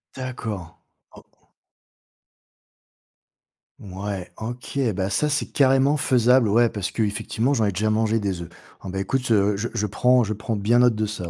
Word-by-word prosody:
D'accord. 110 -9 -6 0.4
Oh. - - -14 2.6
Mouais, 95 -3 -6
OK. 120 +5 -6 0.2
Bah 95 0 -1
ça, 150 +9 +1
c'est 145 0 -2
carrément 135 +1 +3
faisable, 125 -3 +3
ouais. 120 +3 +4
Parce 100 -4 -4
qu'effectivement, 110 +4 -1
j'en 115 -5 +1
ai 100 - +1
déjà 105 +4 -1
mangé, 110 +1 +1
des 95 -4 -3
œufs. 85 - -8 0.3
Oh, - - -6
ben 95 +1 -4
écoute, 135 +7 -1
je 105 -2 +2 0.2
je 110 -3 -2
prends 125 +4 +3
je 110 -1 -2
prends 110 +2 -4
bien 110 +4 +2
note 125 -2 +4
de 110 0 -1
ça, 100 -5 -5
110 Hz, 160 wpm, -23 LUFS, 100-125 Hz, 2.6 s, ouais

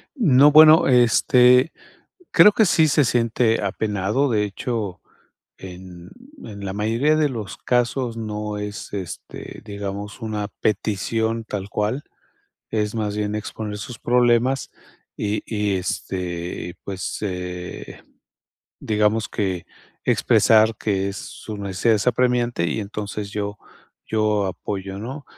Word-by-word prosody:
No, 145 - +5
bueno, 155 +1 +8
este, 125 +2 +5 0.6
creo 210 - +7
que 220 +1 +4
sí 160 -4 +4
se 145 0 +3
siente 115 -2 +1
apenado, 105 +6 0
de 105 -2 +2
hecho, 105 -2 -4 0.6
en 90 -1 -11 0.3
en 100 -2 -9
la 95 - -3
mayoría 115 +9 +1
de 155 -1 +3
los 110 -5 -6
casos 125 -1 0
no 105 -1 -4
es, 105 0 -6
este, 95 -4 -7
digamos, 100 +2 -6
una 105 -2 -3
petición 110 +2 -1
tal 100 -2 -5
cual, 110 +8 -1 0.7
es 105 0 -1
más 105 -2 -2
bien 105 0 -2
exponer 105 0 -5
sus 110 +3 -8
problemas 120 +2 +2 0.5
y 105 +1 -2
y, 105 -3 -1
este, 90 -2 -4
pues, 95 -2 -4
eh, 90 -2 -6 0.8
digamos 105 +1 +1
que 95 -4 -2 0.4
expresar 110 0 +4
que, 100 -2 -1
su 105 +2 -8
necesidad 100 +3 +1
es 105 - -3
apremiante 120 -6 +1
y 110 - -2
entonces 105 0 -5
yo 105 0 -4 0.5
yo 105 -2 +1
apoyo, 95 +1 -5
¿no? 130 +7 -7
105 Hz, 120 wpm, -22 LUFS, 100-120 Hz, 0.8 s, bueno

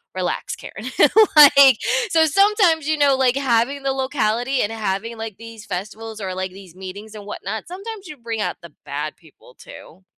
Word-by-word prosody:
"Relax, 180 -1 -3
Karen," 220 +6 -9 0.5
like 280 -3 +8 0.3
so 320 -2 +4
sometimes, 360 -2 +3
you 310 - +1
know, 285 -2 +4
like, 260 -1 +2
having 270 +1 0
the 270 - 0
locality 260 -1 -1
and 210 - -1
having, 220 +1 -3
like, 220 -3 -6
these 230 -1 -11
festivals, 215 +4 -7
or, 190 -1 -4
like, 185 0 -4
these 190 -3 -14
meetings, 200 +3 -10
and 205 - -10
whatnot, 215 +1 -6
sometimes 395 +2 -8
you 305 - -9
bring 230 -2 -5
out - - -3
the 170 -4 -13
bad 150 +2 -5
people 150 -5 -21
too. 185 +4 -14
225 Hz, 175 wpm, -20 LUFS, 195-280 Hz, 0.5 s, like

